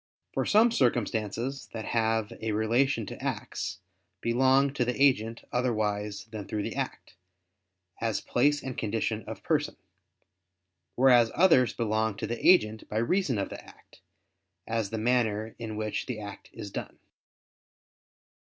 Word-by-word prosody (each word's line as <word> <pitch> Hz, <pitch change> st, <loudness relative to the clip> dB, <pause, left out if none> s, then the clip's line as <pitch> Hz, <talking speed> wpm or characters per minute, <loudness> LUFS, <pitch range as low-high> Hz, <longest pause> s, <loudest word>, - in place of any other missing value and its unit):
For -, -, -1 dB
some 225 Hz, +3 st, +5 dB
circumstances 120 Hz, -, -1 dB
that 110 Hz, -1 st, -5 dB
have 110 Hz, -2 st, +1 dB
a 110 Hz, -1 st, -1 dB
relation 115 Hz, +3 st, +1 dB
to -, -, -8 dB
acts, -, -, -3 dB, 0.4 s
belong 130 Hz, +3 st, +3 dB
to 140 Hz, -, +1 dB
the 125 Hz, +2 st, -2 dB
agent 115 Hz, -5 st, +2 dB
otherwise 105 Hz, -4 st, -1 dB
than 105 Hz, -3 st, -6 dB
through 105 Hz, -1 st, -2 dB
the -, -, -4 dB
act; -, -, -4 dB, 0.9 s
as 115 Hz, -2 st, 0 dB
place 145 Hz, +3 st, +1 dB
and 130 Hz, -2 st, -5 dB
condition 110 Hz, 0 st, -2 dB
of -, -, -8 dB
person; -, -, 0 dB, 1.2 s
whereas 120 Hz, -3 st, +5 dB
others 160 Hz, -8 st, +5 dB
belong 110 Hz, -2 st, 0 dB
to -, -, -3 dB
the 120 Hz, -, -4 dB
agent 110 Hz, -12 st, +4 dB
by 105 Hz, -, -3 dB
reason 130 Hz, -, +1 dB
of 100 Hz, -, -2 dB
the -, -, -8 dB
act, -, -, -19 dB, 0.6 s
as 110 Hz, -3 st, -1 dB
the 110 Hz, -, -3 dB
manner 110 Hz, -2 st, +1 dB
in 110 Hz, -2 st, -5 dB
which 105 Hz, 0 st, -3 dB
the 125 Hz, -4 st, -4 dB
act 100 Hz, -1 st, -9 dB
is 100 Hz, -, -8 dB
done. -, -, -6 dB
115 Hz, 145 wpm, -28 LUFS, 110-125 Hz, 1.2 s, some